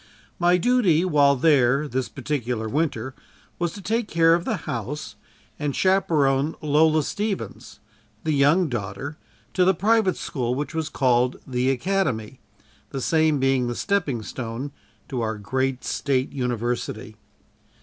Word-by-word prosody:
My 175 +1 +4
duty 185 -5 +3
while 145 -5 +4
there 140 0 +3
this 130 -1 -2
particular 125 -5 -3
winter, 130 -2 -1 0.5
was 175 -1 0
to 200 - -10
take 225 +2 0
care 165 -2 +4
of 170 0 +1
the - - 0
house 125 +6 -4 0.4
and 145 -2 -2
chaperone 155 -7 +2
Lola 155 +1 +3
Stevens, 205 +4 -4 0.4
the 155 - 0
young 150 +5 +4
daughter 120 +4 -5 0.3
to 185 - +3
the 190 +1 +4
private 210 +1 +2
school 125 -5 -2
which 145 +5 -4
was 160 -1 -2
called 125 -1 +1
the 125 0 0
"Academy" 135 - -1 0.5
the 135 - -4
same 155 +1 +2
being 135 -2 +2
the 120 - -3
stepping 165 - -1
stone 120 +5 -5 0.4
to 130 -4 -3
our 110 -1 -2
great 130 +5 -2
State 135 -2 -1
University. 120 -2 -3
140 Hz, 140 wpm, -24 LUFS, 125-165 Hz, 0.5 s, My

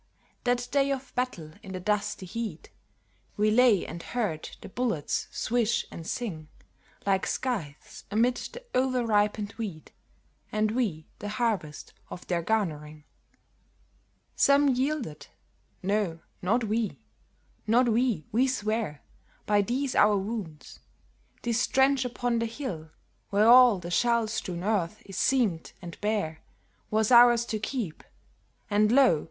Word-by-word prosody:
That 245 0 +1
day 280 0 +2
of 270 -1 -4
battle 215 -12 -3
in 190 -3 -9
the 185 - -4
dusty 205 0 -1
heat 210 -3 -6 0.7
We 210 +1 +3
lay 230 -4 +4
and 170 - -7
heard 210 -10 -3
the - - -9
bullets 225 - -1
swish 235 -1 0
and 165 0 -8
sing 165 -11 -4 0.6
Like 195 -1 +1
scythes 185 - -4
amid 235 +4 +2
the - - -8
over 255 -1 +1
ripened 210 -1 +1
wheat, 190 -9 -6 0.6
And 215 0 +1
we 210 -10 -1
the 205 - -5
harvest 210 -9 -2 0.2
of 180 - -9
their 175 -2 -1
garnering. 155 -7 -2 1.3
Some 280 0 +4
yielded, 260 - -2 0.6
No, 195 -4 0 0.2
not 230 +7 +1
we! 220 0 -1 0.7
Not 240 +3 +4
we, 230 - +1
we 250 +5 +3
swear 215 - -2 0.4
By 205 -1 +3
these 255 +5 -1
our 210 -1 +5
wounds; 195 -7 -6 0.6
this 235 +1 +1
trench 265 -1 +3
upon 245 -1 -1
the 230 - 0
hill 225 - -6 0.4
Where 210 +2 +3
all 245 -3 +8
the 175 -1 -7
shell 235 +3 +2
strewn 180 -5 -4
earth 205 -2 -1
is 195 -2 -8
seamed 225 -12 +1
and 175 -2 -10
bare, 205 -7 -1 0.5
Was 215 +2 +1
ours 240 -1 +7
to 220 -2 -3
keep; 215 - -4 0.6
and 210 +1 +3
lo! 255 - +5
215 Hz, 135 wpm, -28 LUFS, 185-245 Hz, 1.3 s, all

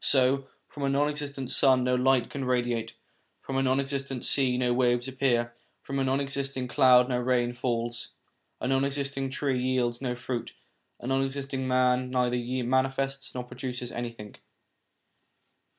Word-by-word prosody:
So, 135 0 +3 0.2
from 145 - -10
a 140 - +1
non 145 +2 +2
existing 145 -2 -4
sun 130 -2 +4
no 125 0 +1
light 125 -1 +3
can 140 - -4
radiate, 120 -3 -1 0.4
from 135 - -6
a 135 - +2
non 130 0 +2
existing 135 -2 -3
sea 130 -3 +2
no 125 -1 +2
waves 120 0 +2
appear, 125 -3 0 0.3
from 135 0 -3
a - - +2
non 135 +1 +1
existing 140 -2 -2
cloud 125 -2 +6
no 125 -1 0
rain 120 -1 +1
falls; 120 -1 -3 0.5
a - - -2
non 135 +1 +2
existing 140 -1 -2
tree 130 -1 -1
yields 125 -1 0
no 125 -2 -2
fruit; 125 -1 -4 0.5
a - - -9
non 135 +1 +1
existing 135 -1 -3
man 125 0 +2
neither 125 -1 +1 0.3
manifests 135 +1 0
nor 125 - -3
produces 125 0 -6
anything. 115 -3 -6
130 Hz, 160 wpm, -28 LUFS, 125-135 Hz, 0.5 s, cloud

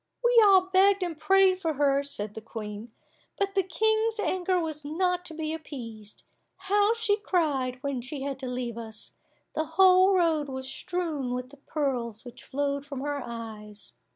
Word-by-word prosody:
We 480 -1 +6
all 380 -2 +5
begged 390 +1 +5
and 345 -2 -3
prayed 375 +4 +4
for 325 -3 0
her, 280 -1 +2
said 215 -7 -5
the 220 - -7
Queen, 215 0 -7 0.5
"but 395 -1 0
the 390 - +3
King's 440 +5 +1
anger 370 -1 +1
was 310 -3 -4
not 360 +4 0
to 320 - -7
be 315 0 -3
appeased. 230 -9 -8 0.3
How 410 +3 +2
she 435 -3 +1
cried 295 - 0
when 280 -3 -2
she 265 +2 -6
had 275 -1 -4
to 265 - -5
leave 245 -2 -4
us! 220 -2 -9 0.4
The 315 - -1
whole 375 0 +7
road 320 -5 +2
was 260 0 -5
strewn 295 -3 -3
with 250 +1 -5
the 285 - -14
pearls 260 -7 -3
which 245 0 -11
flowed 280 0 -2
from 280 -2 -6
her 290 0 -2
eyes. 220 -3 -8
295 Hz, 175 wpm, -28 LUFS, 255-370 Hz, 0.5 s, whole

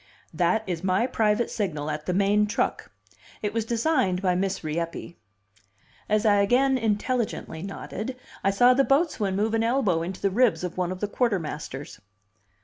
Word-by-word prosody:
"That 175 +7 +1
is 175 -2 -4
my 190 +4 +2
private 220 -2 +1
signal 155 -8 -2
at 150 0 -5
the 180 - +1
main 205 +2 +3
truck. 210 - -2 0.5
It 210 0 -1
was 225 -1 -1
designed 235 - +1
by 185 -1 +1
Miss 190 +1 -1
Rieppe." 165 +2 -4 0.9
As 215 +1 +2
I 205 -1 +5
again 250 +7 +3
intelligently 225 -6 -1
nodded, 210 +5 -6 0.3
I 195 - +3
saw 245 +6 +5
the 275 +2 +3
boatswain 270 - +1
move 215 +3 0
an 225 0 +2
elbow 230 -9 +1
into 180 +3 -5
the 195 - 0
ribs 235 -1 +2
of 180 - -4
one 180 -1 -1
of 185 - -6
the 205 - 0
quartermasters. 160 - -3
205 Hz, 165 wpm, -26 LUFS, 180-230 Hz, 0.9 s, I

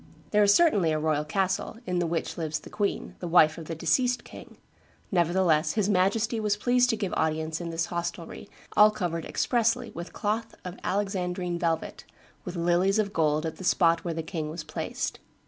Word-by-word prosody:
There 210 - +4
is 205 -1 +6
certainly 205 - +4
a 155 - +1
royal 155 -1 0
castle, 190 +6 -1
in 180 -3 -1
the 175 - 0
which 165 0 -2
lives 160 -2 -3
the - - -13
queen, 205 -1 -2
the 175 - -5
wife 165 -2 +5
of 165 - -8
the 165 - -5
deceased 245 - +1
king; - - -12 0.5
nevertheless 175 -3 +2
his 210 -2 +1
Majesty 210 +5 +1
was 210 -1 0
pleased 245 +3 +3
to 225 - +2
give 200 -4 -3
audience 160 +1 -1
in 170 - -4
this 165 0 -1
hostelry, 170 +2 -5 0.3
all 210 0 +8
covered 175 -6 -3
expressly 235 0 0
with 170 +1 -7
cloth 220 +2 -2
of 180 0 -7
Alexandrine 180 -3 -2
velvet, 165 -2 -2 0.4
with 180 -1 -5
lilies 175 +4 +2
of 205 -2 0
gold 155 -1 +1
at 160 - -4
the - - -9
spot 170 -2 +3
where 170 -2 -3
the 165 - -3
king 155 -2 -4
was 160 +1 -6
placed. 155 +1 -4
180 Hz, 190 wpm, -27 LUFS, 165-205 Hz, 0.5 s, all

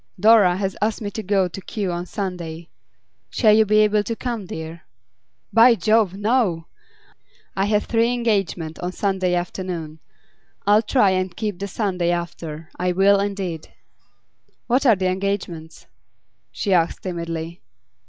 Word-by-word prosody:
'Dora 210 -5 +5
has 195 -1 -2
asked 215 0 0
me 205 -2 -5
to 220 - -5
go 195 -2 +1
to 185 +2 -8
Kew 195 -1 -3
on 175 +1 -4
Sunday. 170 -5 -5 0.6
Shall 215 - +4
you 220 0 +5
be 215 +1 +4
able 210 0 +3
to 230 +3 -4
come, 230 -5 -4
dear?' 160 0 -7 0.7
'By 230 +2 +7
Jove, 215 -1 +2
no! 205 -6 0 0.9
I 195 - +1
have 210 0 +1
three 230 +1 +1
engagements 195 -9 -1
on 180 +1 -4
Sunday 190 -3 0
afternoon. 175 -3 -4 0.7
I'll 205 +2 +5
try 215 -3 +3
and 185 -1 -2
keep 210 -5 -3
the 200 - -3
Sunday 185 -4 -1
after; 165 -2 -4
I 180 0 0
will 195 +2 +4
indeed.' 195 -5 -4 0.9
'What 260 +3 +2
are 230 - +6
the 190 -1 -3
engagements?' 185 -4 -3 0.7
she 200 - -1
asked 170 -2 +1
timidly. 170 -2 -5
190 Hz, 145 wpm, -22 LUFS, 175-210 Hz, 0.9 s, By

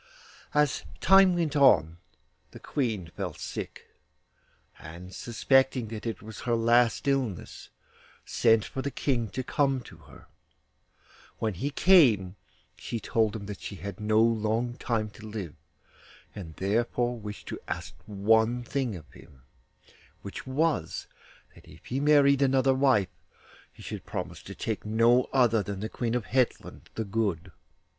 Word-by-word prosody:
As 150 -2 +2 0.2
time 195 -1 +6
went 165 -3 -1
on 85 - +4 0.5
the - - -12
Queen 115 - -2
fell - - -4
sick, - - -7 0.9
and 85 +4 -10
suspecting 130 +1 +1
that 110 +1 -6
it 115 - -5
was 110 0 -9
her 120 -1 0
last 120 +3 +3
illness, 130 -10 -2 0.6
sent 115 -2 +3
for 135 - -5
the 140 - -2
King 120 -5 -1
to 130 +8 -4
come 135 +1 +1
to 95 -8 -14
her. 70 -3 -16 1.1
When 110 -2 -1
he 120 +11 -3
came 135 - +4 0.4
she 115 - -5
told 110 -1 0
him 105 -2 -6
that 105 0 -7
she 100 - -6
had 100 0 -7
no 110 +1 +2
long 115 +1 0
time 110 -3 -2
to 110 +1 -11
live, 100 -8 -6 0.8
and 80 -6 -9
therefore 120 +4 0
wished 105 -1 -8
to - - -5
ask - - -5
one 110 +4 +2
thing 125 -3 -2
of 80 -4 -10
him, 65 -2 -17 0.8
which 100 +5 -8
was, 150 +4 -1 0.5
that - - -18
if - - -16
he 130 - -2
married 140 -1 +4
another 135 -1 +3
wife 130 -8 +3 0.6
he - - -15
should - - -7
promise - - -5
to - - -10
take 110 -2 -3
no 115 +3 +3
other 120 -4 +4
one 100 - -3
than 100 -2 -5
the 110 - -3
Queen 120 0 -2
of 120 -5 -2
Hetland 130 -2 -1
the 110 - -2
Good. 100 -5 -2
115 Hz, 150 wpm, -28 LUFS, 105-130 Hz, 1.1 s, time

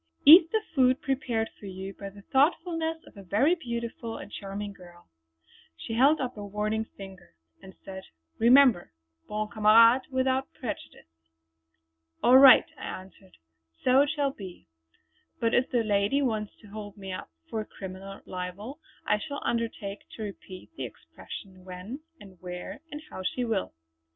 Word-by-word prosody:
Eat 325 +3 +10
the 440 -1 +1
food 260 -2 +4
prepared 250 -5 -1
for 205 - -9
you 190 +1 -7
by 200 0 -8
the 200 0 -15
thoughtfulness 325 - +1
of - - -17
a - - -9
very 215 - +2
beautiful 235 -6 -5
and - - -10
charming 200 +1 -6
girl!" 175 -2 -16 0.7
She 225 - -6
held 275 +7 +4
up 255 -2 -3
a 205 - -6
warning 210 +2 -2
finger 190 - -12 0.3
and 190 0 -13
said: 190 -1 -8 0.3
"Remember 240 - +5 0.3
'Bon 215 0 -2
Camarade 230 +3 +6
without 260 0 0
prejudice.'" 80 - -9 0.9
"All 255 +2 +8
right" 270 -1 +9
I 185 - -5
answered 190 -1 -19 0.5
"so 255 +2 +5
it 285 - +2
shall 290 -3 0
be. 190 -8 -10 0.7
But 230 0 +1
if 250 +2 +2
the 240 -3 +1
lady 205 +6 +1
wants 215 -5 -2
to 215 - -15
hold 205 0 -8
me 195 -1 -6
up 185 - -7 0.2
for 220 -1 -3
criminal 195 -1 -9
libel 190 - -6 0.3
I 210 - +2
shall 285 +5 -6
undertake 225 -4 -3
to 220 - -6
repeat 190 - -9
the - - -5
expression 185 -2 -11
when, 185 +8 -8 0.2
and 190 -3 -15
where, 180 +8 -7
and 295 +1 -7
how - - -6
she 245 +7 -2
will. 215 - -2
215 Hz, 155 wpm, -28 LUFS, 195-260 Hz, 0.9 s, Eat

